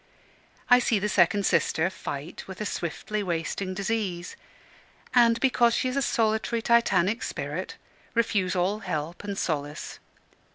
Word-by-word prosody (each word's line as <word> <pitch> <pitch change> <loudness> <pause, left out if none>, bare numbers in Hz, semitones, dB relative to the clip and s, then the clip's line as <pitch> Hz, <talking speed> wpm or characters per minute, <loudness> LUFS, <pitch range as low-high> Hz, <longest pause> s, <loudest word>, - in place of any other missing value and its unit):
I 245 -1 +7
see 235 -3 +2
the 205 +1 0
second 200 0 +3
sister 160 0 +2
fight 155 -3 -7
with 190 -1 -9
a 215 - -2
swiftly 205 +4 -3
wasting 185 +1 -2
disease; 195 -3 -2 0.8
and, 235 -2 +5
because 240 -3 +3
she 255 - 0
is 255 - -4
a 275 - +1
solitary 225 -1 0
Titanic 230 -2 +3
spirit, - - -4 0.4
refuse 205 -6 +1
all 185 +4 +1
help 155 -2 -4
and 200 -1 -4
solace. 150 -4 -3
200 Hz, 135 wpm, -27 LUFS, 175-230 Hz, 0.8 s, I